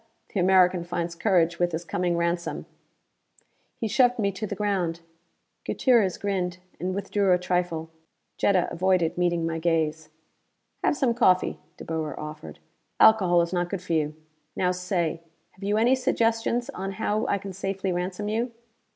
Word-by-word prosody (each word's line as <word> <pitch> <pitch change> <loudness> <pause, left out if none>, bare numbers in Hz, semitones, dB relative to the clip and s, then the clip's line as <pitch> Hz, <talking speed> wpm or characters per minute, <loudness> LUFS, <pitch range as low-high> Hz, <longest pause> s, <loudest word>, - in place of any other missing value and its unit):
The 200 - 0
American 180 -1 +4
finds 170 -1 -3
courage 170 -2 +2
with 175 -1 +1
his 165 +2 -3
coming 175 0 -1
ransom!" 170 0 -2 1.1
He 225 - -2
shoved 245 +2 +3
me 200 -3 +1
to 200 +3 -5
the 200 - -4
ground. 185 -5 -1 0.6
Gutierrez 230 -8 +2
grinned, 185 -3 -2 0.2
and 185 +1 -2
withdrew 200 0 +1
a - - +4
trifle. 175 -2 -1 0.5
Jetta 185 -3 +2
avoided 175 -1 +1
meeting 175 -1 +1
my 165 0 -2
gaze. 160 -1 0 0.7
"Have - - +2
some 255 -3 +2
coffee," 185 -6 +2 0.2
De - - -9
Boer 160 -3 -3
offered. 150 0 -8 0.4
"Alcohol 180 -6 +6
is 170 - -5
not 175 -1 0
good 195 - -3
for 175 - -3
you. 155 -1 0 0.4
Now 180 -1 +1
say: 180 -3 -2 0.3
have 190 - -15
you 205 +2 +1
any 235 +4 +4
suggestions 240 0 0
on 195 -5 -5
how 210 +3 -1
I 200 - +1
can 195 0 -7
safely 195 0 -3
ransom 180 +3 -3
you?" 230 +3 -1
180 Hz, 160 wpm, -26 LUFS, 170-205 Hz, 1.1 s, Alcohol